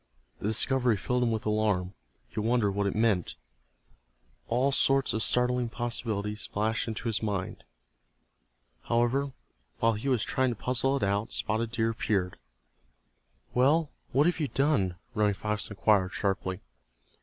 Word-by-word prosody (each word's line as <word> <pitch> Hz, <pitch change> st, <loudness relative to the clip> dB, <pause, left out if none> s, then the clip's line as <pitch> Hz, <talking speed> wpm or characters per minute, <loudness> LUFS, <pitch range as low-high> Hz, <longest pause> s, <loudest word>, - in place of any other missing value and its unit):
The -, -, -3 dB
discovery 120 Hz, +1 st, +2 dB
filled 125 Hz, +5 st, -1 dB
him 120 Hz, -, +2 dB
with 110 Hz, -1 st, -2 dB
alarm. 105 Hz, -4 st, 0 dB, 0.3 s
He -, -, -6 dB
wondered 115 Hz, -1 st, +2 dB
what 100 Hz, +1 st, 0 dB
it 100 Hz, -, -2 dB
meant. 105 Hz, -6 st, +1 dB, 1.1 s
All 125 Hz, +4 st, +2 dB
sorts 135 Hz, 0 st, +3 dB
of 110 Hz, -, -1 dB
startling 125 Hz, 0 st, +2 dB
possibilities 110 Hz, -3 st, -2 dB
flashed 110 Hz, +3 st, -1 dB
into 115 Hz, +1 st, -4 dB
his 115 Hz, -2 st, 0 dB
mind. 100 Hz, -4 st, -3 dB, 1.2 s
However, 120 Hz, +4 st, +1 dB, 0.5 s
while 115 Hz, -, +2 dB
he 110 Hz, +6 st, -3 dB
was 125 Hz, -4 st, +2 dB
trying 130 Hz, +1 st, +1 dB
to 120 Hz, -, -2 dB
puzzle 130 Hz, +4 st, 0 dB
it -, -, -3 dB
out 100 Hz, +2 st, 0 dB
Spotted 110 Hz, +1 st, -1 dB
Deer 115 Hz, -1 st, +1 dB
appeared. 95 Hz, -5 st, -1 dB, 1.1 s
"Well, 145 Hz, +5 st, +3 dB, 0.2 s
what 140 Hz, +3 st, +3 dB
have 175 Hz, 0 st, +1 dB
you 150 Hz, -, 0 dB
done?" 135 Hz, -11 st, +1 dB, 0.2 s
Running 105 Hz, -2 st, +2 dB
Fox 105 Hz, +1 st, -2 dB
inquired, 100 Hz, -3 st, +2 dB
sharply. 95 Hz, -2 st, -2 dB
115 Hz, 145 wpm, -29 LUFS, 105-125 Hz, 1.2 s, sorts